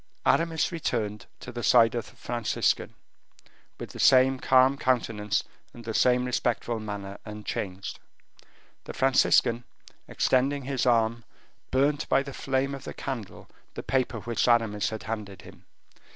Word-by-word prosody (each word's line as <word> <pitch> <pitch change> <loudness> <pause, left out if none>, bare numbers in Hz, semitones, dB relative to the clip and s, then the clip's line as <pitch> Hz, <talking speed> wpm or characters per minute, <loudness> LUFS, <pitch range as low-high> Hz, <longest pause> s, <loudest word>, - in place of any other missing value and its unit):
Aramis 165 0 +2
returned 110 - -3
to 125 - -8
the 120 0 -6
side 115 -2 +5
of 120 -2 -4
the - - -21
Franciscan, 120 -2 -1 0.8
with - - -7
the - - -11
same 130 0 +5
calm 130 +1 +4
countenance 115 -6 0 0.3
and 120 -1 -11
the 110 - -4
same 125 +2 +3
respectful 120 -2 -1
manner, 100 -2 -6
unchanged. 105 -3 -5 0.9
The - - -7
Franciscan, 125 -2 +3 0.4
extending 135 +2 +1
his 130 -1 -1
arm, 115 -1 +2 0.5
burnt 140 +3 +1
by 135 - +3
the 140 -1 -8
flame 135 +1 -1
of 135 -1 -7
the - - -8
candle 115 -8 -6 0.3
the - - -6
paper 125 -4 -1
which 120 +2 -1
Aramis 110 -6 +2
had 110 - -6
handed 105 -4 -6
him. - - -15
120 Hz, 140 wpm, -27 LUFS, 110-130 Hz, 0.9 s, side